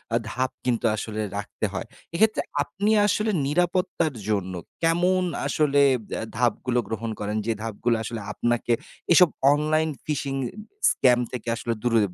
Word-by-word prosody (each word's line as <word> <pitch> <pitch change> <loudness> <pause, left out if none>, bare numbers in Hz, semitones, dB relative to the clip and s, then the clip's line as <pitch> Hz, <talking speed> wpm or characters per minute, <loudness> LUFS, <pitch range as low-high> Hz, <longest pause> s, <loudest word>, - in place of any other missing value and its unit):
আ - - +5
ধাপ 130 +1 -1
কিন্তু 120 -2 0
আসলে 110 0 -4 0.2
রাখতে 100 +1 -3
হয়। 95 +4 -4 0.3
এক্ষেত্রে 215 +5 +3 0.2
আপনি 205 +2 -1 0.2
আসলে 215 +2 +1 0.2
নিরাপত্তার 175 0 +1 0.2
জন্য 95 -3 0 0.3
কেমন 175 +3 +3 0.2
আসলে 145 -2 +3 0.3
বে - - -3 0.2
ধাপগুলো 125 +1 +1
গ্রহণ 110 +1 -3
করেন? 105 +1 -2
যে 115 - +1
ধাপগুলো 115 +2 0
আসলে 115 0 -5
আপনাকে 120 +1 0 0.4
এসব 175 +1 +7 0.2
অনলাইন 155 +2 +1 0.2
ফিশিং 140 -2 -2 0.6
স্ক্যাম 125 -2 +4
থেকে 125 -1 -6
আসলে 115 +1 -2
দূরে 115 -2 +3
130 Hz, 140 wpm, -25 LUFS, 115-165 Hz, 0.6 s, এসব